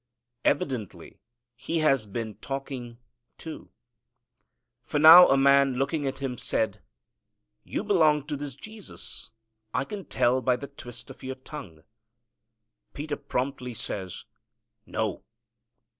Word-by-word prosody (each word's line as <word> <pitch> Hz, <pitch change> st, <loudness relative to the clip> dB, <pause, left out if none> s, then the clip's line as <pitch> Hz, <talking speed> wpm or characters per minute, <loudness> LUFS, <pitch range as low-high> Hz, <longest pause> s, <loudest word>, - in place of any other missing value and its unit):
Evidently 130 Hz, -8 st, -2 dB, 0.4 s
he 135 Hz, +7 st, -3 dB
has 135 Hz, -8 st, +3 dB
been 110 Hz, +1 st, -4 dB
talking, 135 Hz, -3 st, -6 dB, 0.4 s
too. 160 Hz, -1 st, -9 dB, 1.1 s
For 150 Hz, -, -3 dB
now 165 Hz, +4 st, +11 dB
a 135 Hz, -, +5 dB
man 140 Hz, -1 st, +5 dB
looking 140 Hz, +3 st, 0 dB
at 135 Hz, 0 st, -3 dB
him, 130 Hz, -3 st, -4 dB
said, 105 Hz, -3 st, -1 dB, 0.8 s
"You -, -, -3 dB
belong 155 Hz, -8 st, +3 dB
to 150 Hz, -1 st, -3 dB
this 140 Hz, -2 st, -6 dB
Jesus. 215 Hz, -, -8 dB, 0.5 s
I -, -, +1 dB
can 200 Hz, +4 st, -7 dB
tell 125 Hz, +2 st, +2 dB
by 125 Hz, -1 st, +3 dB
the 140 Hz, -, -6 dB
twist 120 Hz, -4 st, -10 dB
of -, -, -14 dB
your 130 Hz, 0 st, -5 dB
tongue." 105 Hz, -, -10 dB, 1.1 s
Peter 145 Hz, 0 st, -3 dB
promptly 130 Hz, -3 st, -3 dB
says, 95 Hz, -4 st, -5 dB, 0.6 s
"No." -, -, -2 dB
135 Hz, 120 wpm, -27 LUFS, 125-150 Hz, 1.1 s, now